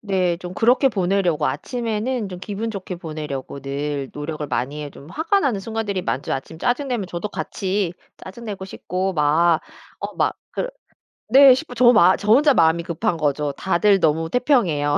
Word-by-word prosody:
네. 185 -4 0
좀 180 0 -8
그렇게 245 +6 +4
보내려고 190 - +1
아침에는 235 -1 -2
좀 180 - -7
기분 210 +4 -4
좋게 190 -3 -6
보내려고 150 -5 -6
늘 140 0 -3
노력을 150 0 -4
많이 140 +3 -3
해요. 145 -1 -6
좀 145 +4 -14
화가 335 +6 +1
나는 250 -9 0
순간들이 210 -3 -3
많죠. 135 - -2
아침 135 +4 -5
짜증 245 - 0
내면 235 -7 -2
저도 175 +5 -4
같이 195 -3 -2 0.2
짜증 215 +5 -11
내고 200 -4 -5
싶고 190 0 -3
막 160 +2 +3 0.4
어 - - -6
막 - - +1 0.2
그 - - -2 0.6
네 270 0 +9
싶고 255 -1 -4
저 245 +1 +3
마 185 -3 +6
저 210 +1 0
혼자 290 +2 +5
마음이 165 0 +4
급한 170 +3 -1
거죠. 145 -1 0
다들 195 +5 +2
너무 160 0 +1
태평해요. 180 - +2
185 Hz, 335 characters per minute, -21 LUFS, 155-225 Hz, 0.6 s, 네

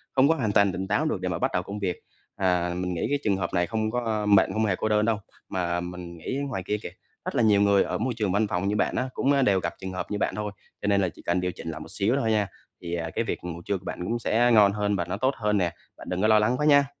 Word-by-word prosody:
Không 135 +1 +5
có 165 - +4
hoàn 110 -7 0
toàn 100 -1 +4
tỉnh 95 +2 -4
táo - - +1
được - - -1
để - - -1
mà - - -1
bắt - - +1
đầu 90 - 0
công 100 +2 -6
việc, 90 -4 -1 0.4
à, 90 -2 +1
mình 90 0 -2
nghĩ 85 - -1
cái 145 0 +1
trường 100 -3 +2
hợp 90 -2 -3
này 90 -1 +2
không 110 -1 -1
có 110 -3 -1
mệnh 100 -2 +4
không 110 0 +1
hề 100 - +1
cô 110 - -2
đơn 105 0 +3
đâu, 115 -2 +2 0.3
mà 85 -2 -1
mình 90 -1 -7
nghĩ 130 +11 -4
ngoài 95 -7 -3
kia 105 - 0
kìa, - - -4 0.4
rất - - -3
là 120 - +3
nhiều 105 -2 +5
người 100 -1 +4
ở - - -2
môi 125 +3 -1
trường 105 -4 0
văn 105 +2 +2
phòng 95 0 -1
như 105 - +1
bạn 105 - +1
á 130 +1 -1
cũng, 140 - +1
a, 140 -1 +3
đều 100 -6 +3
gặp 85 - -3
trường 95 0 -5
hợp 90 - -5
như 105 - 0
bạn - - -1
thôi, 105 -1 -3 0.3
cho 105 - -2
nên 100 -1 +3
là 90 - +1
chỉ - - -15
cần 90 +1 0
điều 90 0 -1
chỉnh 80 - -7
lại 80 - -7
một - - -10
xíu 110 +6 +1
thôi 110 -3 +1
nha, 105 -2 +2 0.3
thì, 85 0 -3
à, 80 -1 -3
cái 115 - +1
việc - - -4
ngủ 85 -1 -6
trưa 100 - 0
của 95 - -16
bạn - - -5
cũng 120 +6 -1
sẽ 120 +2 +2
ngon 105 -3 +7
hơn 105 0 0
và 85 -2 -1
nó - - -3
tốt 130 +4 +1
hơn 105 -2 +1
nè, 90 -3 0 0.2
bạn - - -10
đừng 90 +1 -1
có 110 - +4
lo 110 -1 +6
lắng 120 +4 +2
quá 150 - 0
nha. 145 -1 +6
100 Hz, 320 wpm, -26 LUFS, 90-110 Hz, 0.4 s, ngon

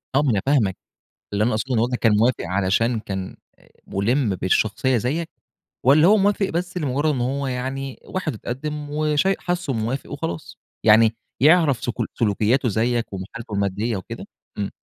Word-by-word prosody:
آه، 140 - +5
ما 140 -5 +2
أنا 100 - +1
فاهمك 120 -10 +2 0.6
اللي 105 +1 +2
أنا 120 - +2
أقصدُه 125 +4 -1
ان - - +2
والدك 120 +2 0
كان 110 -2 +3
موافق 115 +3 +2
علشان 100 +5 +1
كان 95 -3 -5 0.5
مُلِّم 115 +4 +1
بالشخصيّة 110 +7 +1
زيك، 150 +9 -1 0.6
والَّا 150 +6 +6
هو 215 +2 +6
موافق 200 0 +2
بس 180 +2 -3
لمجرّد 145 0 0
إنّ 125 - -2
هو 135 +2 -1
يعني 130 +1 -4
واحد 175 -7 -3
واتقدّم 145 +6 -5
وشاي 150 +5 +1
حاسُه 175 -6 -2
موافق 115 +7 -3
وخلاص، 85 - -5 0.3
يعني 110 +1 +6 0.3
يعرف 150 -4 +4
سك 120 -5 -1 0.3
سلوكياته 115 +4 +2
زيك 115 +1 0
وحالته 105 +4 -7
المادية 100 +3 -1
وكده؟ 95 - -8 0.3
امم. 100 -1 -2
125 Hz, 160 wpm, -22 LUFS, 110-145 Hz, 0.6 s, والَّا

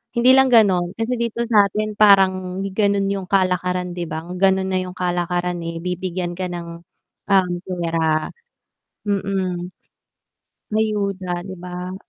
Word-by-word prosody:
hindi 245 +2 +5
lang 265 0 +6
ganon. 195 -6 +3
Kasi 230 +2 -2
dito 235 0 -1
satin 215 -1 +1
parang 190 -2 +4
ganon 200 -1 +1
yung 195 -2 -4
kalakaran 180 -1 0
di 175 -1 -5
ba 160 +1 -5 0.2
ganun 190 0 +2
na 185 - +1
yung 180 - -9
kalakaran, 175 0 -1
eh, 165 0 -5
bibigyan 180 0 -3
ka 185 +1 -4
ng, 170 -1 -7 0.5
um, 190 -3 +3 0.2
pera. 165 -3 -1 0.8
Mm. 190 -3 -2 1.0
Ayuda, 200 -5 -1
di 190 - -6
ba? 180 +1 -7
185 Hz, 130 wpm, -21 LUFS, 175-200 Hz, 1.0 s, lang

